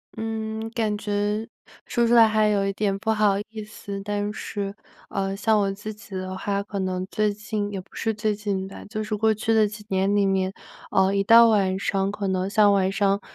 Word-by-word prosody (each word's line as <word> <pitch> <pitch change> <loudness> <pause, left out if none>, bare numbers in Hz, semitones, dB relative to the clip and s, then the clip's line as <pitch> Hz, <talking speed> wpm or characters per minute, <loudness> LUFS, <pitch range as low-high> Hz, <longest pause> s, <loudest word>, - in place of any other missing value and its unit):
嗯， 220 0 -4
感 220 -3 -1
觉 210 +1 -1 0.4
说 235 -1 +1
出 235 - +3
来 230 -2 +8
还 215 0 +3
有 200 -1 +1
一 195 - 0
点 200 -1 0
不 220 +2 -1
好 210 -2 +3
意 220 -1 -7
思。 200 -2 -7
但 205 0 -2
是， 200 -2 -4 0.4
呃， 195 0 -2
像 215 +1 +2
我 200 -1 +1
自 210 +2 -6
己 205 -2 -11
的 185 0 -4
话 200 +1 -2
可 200 0 -5
能 185 -1 -2
最 210 -1 +1
近 210 0 -3
也 195 -2 -4
不 - - -25
是 225 - -1
最 215 0 0
近 200 -2 -3
吧， 195 - -10
就 215 +1 -3
是 215 0 -2
过 220 +1 +3
去 215 +1 0
的 220 -1 +4
几 210 0 -10
年 195 +1 +1
里 205 -1 +3
面， 190 -1 +1 0.4
呃， 190 0 +3
一 200 0 +2
到 230 +3 +8
晚 195 -3 +2
上， 195 0 0
可 205 -1 -3
能 190 0 0
像 210 0 +5
晚 190 -1 +2
上 200 0 +1
205 Hz, 235 characters per minute, -24 LUFS, 195-215 Hz, 0.4 s, 来